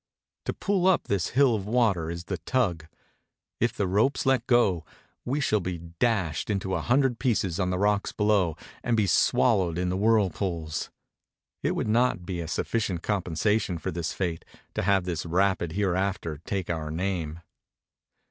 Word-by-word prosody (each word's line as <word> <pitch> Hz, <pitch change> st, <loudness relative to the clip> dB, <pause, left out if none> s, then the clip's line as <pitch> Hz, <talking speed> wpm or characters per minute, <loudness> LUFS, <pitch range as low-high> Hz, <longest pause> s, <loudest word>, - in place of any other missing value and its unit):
To -, -, -1 dB
pull 195 Hz, -3 st, +1 dB
up 190 Hz, -, +4 dB
this 95 Hz, -3 st, 0 dB
hill 135 Hz, -1 st, +4 dB
of 100 Hz, -3 st, -3 dB
water 105 Hz, -8 st, +2 dB
is 85 Hz, 0 st, -5 dB
the 90 Hz, 0 st, -4 dB
tug; 85 Hz, -5 st, 0 dB, 0.7 s
if 120 Hz, 0 st, +2 dB
the 100 Hz, -, -1 dB
ropes 105 Hz, +11 st, +1 dB
let 130 Hz, -3 st, +2 dB
go 105 Hz, -, +3 dB, 0.4 s
we 135 Hz, +4 st, 0 dB
shall 110 Hz, -6 st, +2 dB
be 90 Hz, -1 st, -3 dB
dashed 85 Hz, -1 st, -1 dB
into 95 Hz, -2 st, -1 dB
a -, -, 0 dB
hundred 125 Hz, -1 st, +2 dB
pieces 100 Hz, -, 0 dB
on 90 Hz, -2 st, +1 dB
the 90 Hz, -, 0 dB
rocks 105 Hz, +1 st, +1 dB
below 105 Hz, -6 st, +1 dB, 0.3 s
and 120 Hz, -1 st, +1 dB
be 105 Hz, -, +3 dB
swallowed 95 Hz, 0 st, +3 dB
in 90 Hz, 0 st, 0 dB
the 90 Hz, -, -1 dB
whirlpools. 95 Hz, -6 st, 0 dB, 0.7 s
It -, -, 0 dB
would -, -, -1 dB
not 115 Hz, -5 st, +2 dB
be 90 Hz, -2 st, -4 dB
a 80 Hz, -, -5 dB
sufficient 95 Hz, 0 st, -1 dB
compensation 100 Hz, 0 st, 0 dB
for -, -, -4 dB
this 85 Hz, -1 st, -3 dB
fate 85 Hz, -4 st, -3 dB, 0.3 s
to -, -, -1 dB
have 95 Hz, 0 st, +2 dB
this 85 Hz, -3 st, -3 dB
rapid 90 Hz, -1 st, +1 dB
hereafter 95 Hz, -5 st, -1 dB
take 95 Hz, -3 st, -2 dB
our 80 Hz, -2 st, -3 dB
name. 85 Hz, -1 st, -3 dB
95 Hz, 165 wpm, -27 LUFS, 85-110 Hz, 0.7 s, up